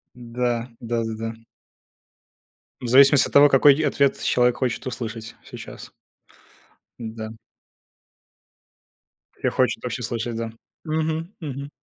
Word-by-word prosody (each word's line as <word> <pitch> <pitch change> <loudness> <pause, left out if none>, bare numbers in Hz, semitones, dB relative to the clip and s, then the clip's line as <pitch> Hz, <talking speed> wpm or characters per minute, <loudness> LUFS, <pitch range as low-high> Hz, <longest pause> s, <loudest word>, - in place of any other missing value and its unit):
Да. 120 0 -2
Да-да-да. 115 -1 -3 1.5
В 125 - -4
зависимости 135 +2 +6
от - - -13
того, 145 0 +8
какой 135 +1 +6
и 155 - -1
ответ 140 -2 +1
человек 125 -1 +2
хочет 130 -1 -2
услышать 115 -3 -6
сейчас. - - -10 1.1
Да. 110 -1 -6 2.1
Или - - +2
хочет - - 0
вообще - - -4
слышать, 115 0 -3
да. 115 -1 -4 0.3
Мгм, 160 +3 -2
мгм. 140 -3 -6
125 Hz, 105 wpm, -23 LUFS, 115-140 Hz, 2.1 s, того